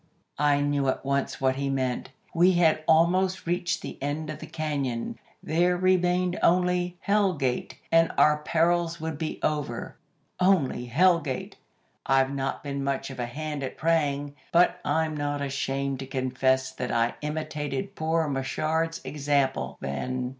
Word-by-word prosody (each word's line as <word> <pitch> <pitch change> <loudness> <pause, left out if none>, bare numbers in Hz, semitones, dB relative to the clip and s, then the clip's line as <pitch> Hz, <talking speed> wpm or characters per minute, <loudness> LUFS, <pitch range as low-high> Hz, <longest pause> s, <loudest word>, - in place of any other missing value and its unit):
"I 145 -1 +3
knew 145 -1 +1
at 130 - -1
once 140 0 -1
what 130 0 +1
he 140 0 -1
meant. 130 -2 -1 0.2
We 180 +2 +5
had 160 -3 +3
almost 180 +4 +3
reached 175 +1 -1
the - - -7
end 150 +2 -2
of 155 - -8
the 160 - -8
cañon. 150 - -3 0.3
There 175 +3 +2
remained 180 0 +2
only 180 0 +2
Hell 200 -3 +2
Gate, 130 -4 -2
and 165 0 +4
our 150 0 +5
perils 170 +2 +1
would 160 -2 -4
be 160 - -3
over. 150 -1 -2 0.4
Only 180 -10 +2
Hell 170 +8 +4
Gate! 135 -5 -5 0.5
I've 135 0 +2
not 135 -1 -3
been 140 -1 -3
much 135 0 -2
of 130 - -9
a 120 - -2
hand 150 +3 -5
at 135 - -5
praying, 145 -3 0 0.2
but 175 +1 +4
I'm 160 -1 0
not 145 -1 -2
ashamed 135 -1 -2
to 135 - -6
confess 130 0 0
that 125 - -4
I 115 0 +1
imitated 150 -2 -3
poor 160 0 0
Machard's 155 +4 -1
example 140 -1 0
then. 125 - -3
150 Hz, 155 wpm, -27 LUFS, 135-165 Hz, 0.5 s, We